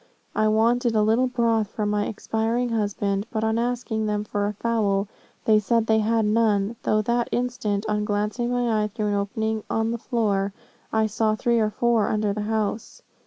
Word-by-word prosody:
I 215 - +2
wanted 230 +2 +2
a 215 - +4
little 225 +4 +3
broth 230 -3 +1
for 210 +1 -3
my 205 0 0
expiring 225 +3 -1
husband, 205 -2 -1
but 220 -1 -2
on 220 +1 +1
asking 235 -2 -1
them 210 0 -1
for 205 -1 -2
a 210 - -2
fowl 205 -2 0 0.4
they 215 -1 +5
said 230 +2 +1
they 220 0 +3
had 225 0 +1
none, 210 -1 +2
though 215 - +1
at 215 - 0
that 240 +1 0
instant, 225 -4 -1
on 210 -1 0
glancing 210 +3 -1
my 240 -3 +1
eye 210 - 0
through 210 0 -3
an - - 0
opening 220 +2 -1
in 225 0 0
the 235 - -3
floor, 205 -5 0 0.4
I 220 0 +2
saw 215 0 +1
three 235 +2 +1
or 215 -1 +2
four 235 -1 +1
under 210 -1 0
the 210 - -3
house. 215 0 -3
220 Hz, 195 wpm, -24 LUFS, 210-230 Hz, 0.4 s, they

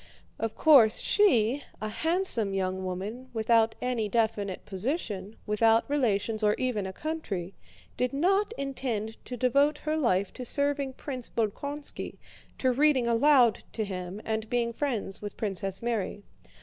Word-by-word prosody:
Of 225 -1 -2
course, 265 -9 +6
she, 275 - +3 0.2
a 215 - -3
handsome 320 - +1
young 190 0 -1
woman 205 +8 -5
without 225 0 +3
any 240 -4 -1
definite 210 -4 -1
position, 205 - -3
without 225 +1 +3
relations 225 -6 0
or 210 -1 +3
even 225 -7 -1
a - - -5
country, 200 - -4 0.4
did 250 0 0
not 390 +9 +2
intend 240 -6 -4
to 250 - -6
devote 280 +5 +3
her 310 0 +1
life 200 -10 +1
to 255 - -6
serving 280 +1 -1
Prince 255 -3 -5
Bolkónski, 280 +7 -3 0.4
to 260 - +2
reading 275 -1 +3
aloud 240 0 +4
to 220 - -2
him 185 0 -5
and 220 0 -2
being 235 -1 0
friends 230 -8 -3
with 205 -1 -7
Princess 195 -1 -3
Mary. 215 -3 -2
230 Hz, 140 wpm, -28 LUFS, 205-275 Hz, 0.4 s, course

